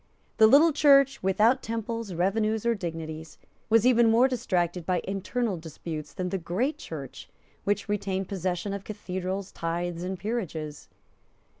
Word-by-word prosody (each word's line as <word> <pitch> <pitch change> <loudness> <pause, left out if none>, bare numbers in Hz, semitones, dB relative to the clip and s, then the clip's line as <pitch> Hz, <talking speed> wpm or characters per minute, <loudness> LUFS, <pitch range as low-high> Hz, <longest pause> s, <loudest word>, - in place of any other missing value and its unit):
The 220 -1 +8
little 295 +7 +6
Church, 275 -2 +5
without 215 +7 +3
temples, 230 -3 -4
revenues 215 +5 0
or 235 - +3
dignities, 160 -5 -6 0.3
was 225 0 +4
even 235 -2 +5
more 235 +4 +5
distracted 180 -9 -1
by 180 +1 0
internal 200 +2 -2
disputes 160 -1 -7
than 185 -2 -3
the 195 +1 -2
great 240 - -1
Church, 140 -5 -8 0.4
which 205 0 0
retained 195 -2 -2
possession 185 0 -2
of 200 -1 -5
cathedrals, 190 -2 -4
tithes 170 +1 -3
and 185 +1 -3
peerages. 175 -8 -4
195 Hz, 140 wpm, -27 LUFS, 175-230 Hz, 0.4 s, The